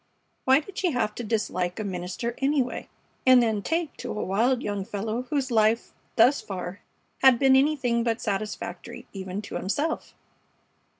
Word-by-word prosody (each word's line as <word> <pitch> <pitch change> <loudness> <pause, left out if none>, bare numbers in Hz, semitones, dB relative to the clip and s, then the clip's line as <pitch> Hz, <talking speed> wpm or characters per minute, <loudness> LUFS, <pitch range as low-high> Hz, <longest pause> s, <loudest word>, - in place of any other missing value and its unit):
Why 265 +3 +5
did 385 +5 -8
she 365 - +2
have 225 -4 0
to 240 - -6
dislike 205 -4 -1
a - - -2
minister, 185 +4 -3
anyway, 270 -2 0 0.3
and 255 -1 +7
then 220 -3 +1
take 330 +5 -1
to - - -6
a - - -3
wild 235 +6 +1
young 205 -1 -2
fellow 220 +5 -3
whose 275 -3 -1
life 220 0 +2 0.2
thus 250 +5 +5
far 185 -1 -6 0.4
had 265 -2 +7
been 265 +1 +5
anything 265 -4 +2
but 230 0 0
satisfactory 200 -3 -4
even 190 +1 -5
to - - -9
himself? 290 - -2
230 Hz, 160 wpm, -26 LUFS, 200-265 Hz, 0.4 s, and